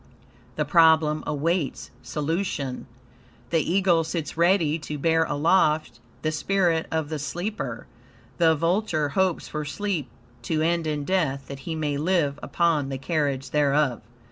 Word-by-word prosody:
The - - 0
problem 160 -3 +4
awaits 155 +1 -1
solution. 150 -4 -3 0.6
The 165 - +3
eagle 175 0 +2
sits 160 -1 -4
ready 170 -2 +3
to 150 -1 -5
bear 160 +2 +2
aloft 155 +1 +2 0.2
the 155 - +1
spirit 170 0 +1
of 160 -2 -2
the 155 -1 -3
sleeper. 175 +8 -4 0.5
The 165 -1 +5
vulture 165 -2 0
hopes 185 +3 0
for 150 -1 -4
sleep 160 -2 -3 0.3
to 155 -2 -1
end 170 0 +1
in 150 -1 -2
death, 145 -8 0
that 140 -1 -7
he 160 - -2
may 150 -2 -1
live 150 -3 +1
upon 160 -5 +1
the 135 - -3
carrion 140 -2 -1
thereof. 145 -3 +2
160 Hz, 140 wpm, -25 LUFS, 145-170 Hz, 0.6 s, The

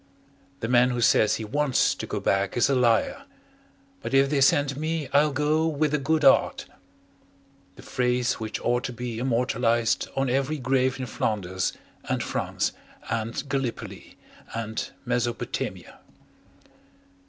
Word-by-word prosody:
"The 115 - -1
man 125 +1 +4
who 125 -1 -2
says 110 -2 +4
he 110 - -5
WANTS 145 +3 +2
to - - -6
go - - -3
back 100 +3 0
is 120 +3 +3
a - - +3
liar. 120 - +2 0.8
But - - -2
if 135 +1 +4
they 140 -2 +2
send 140 0 +3
me, 155 0 -2
I'll 150 +1 +4
go 150 +3 +1
WITH 155 -1 0
A 150 - +2
GOOD 155 +3 0
'EART" 135 - +4 1.1
The - - -13
phrase 125 0 0
which 110 -1 -4
ought 120 +1 +1
to 125 - -4
be 120 -1 -5
immortalized 120 -2 +1
on 135 0 +1
every 135 +4 0
grave 130 -1 +1
in 130 - -3
Flanders 95 -5 -2 0.3
and - - -1
France - - -2 0.4
and 115 +5 -2
Gallipoli 135 -4 -4 0.4
and 110 -1 -3 0.2
Mesopotamia. 120 -1 -3
125 Hz, 140 wpm, -26 LUFS, 115-140 Hz, 1.1 s, man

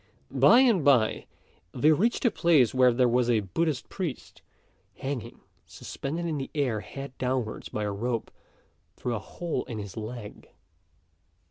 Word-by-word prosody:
By 140 - +6
and 230 - +4
by, 125 -6 +3 0.5
they 145 +5 +4
reached 225 - +1
a 235 - +5
place 155 - +3
where 130 -1 +5
there 125 +1 +3
was 120 0 +2
a 115 -3 +3
Buddhist 145 - -2
priest, 175 -9 -6 0.5
hanging 135 -3 -5 0.3
suspended 165 +5 -5
in 155 -4 -2
the 135 - -5
air 130 -7 0
head 135 +4 -8
downwards, 125 -3 -2
by 105 - -3
a 105 - -1
rope 115 +3 -3 0.6
through 125 - -3
a 110 - -2
hole 160 +5 -4
in 115 - -6
his 100 -3 -7
leg. 110 -1 -8
130 Hz, 150 wpm, -27 LUFS, 115-155 Hz, 0.6 s, By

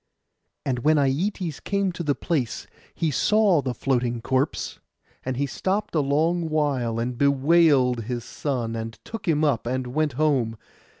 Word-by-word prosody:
And 125 -3 0
when 155 +5 +3
Aietes 155 +4 0
came 200 -1 0
to 170 - -6
the 145 -4 0
place 140 -9 -2 0.3
he 160 -2 0
saw 205 +1 +3
the 130 -2 -3
floating 120 -2 0
corpse; 130 +5 -1 0.4
and 130 -1 -3
he 140 - +1
stopped 195 +8 -2
a 160 - +2
long 160 +4 +1
while, 140 -7 0
and 120 +2 -2
bewailed 140 -4 +4
his 120 0 -3
son, 120 -6 -3
and 115 0 -5
took 225 -3 -7
him 155 -2 +2
up, 130 -6 +1
and 130 +1 -1
went 155 -1 +1
home. 130 -6 +1
140 Hz, 160 wpm, -24 LUFS, 125-160 Hz, 0.4 s, bewailed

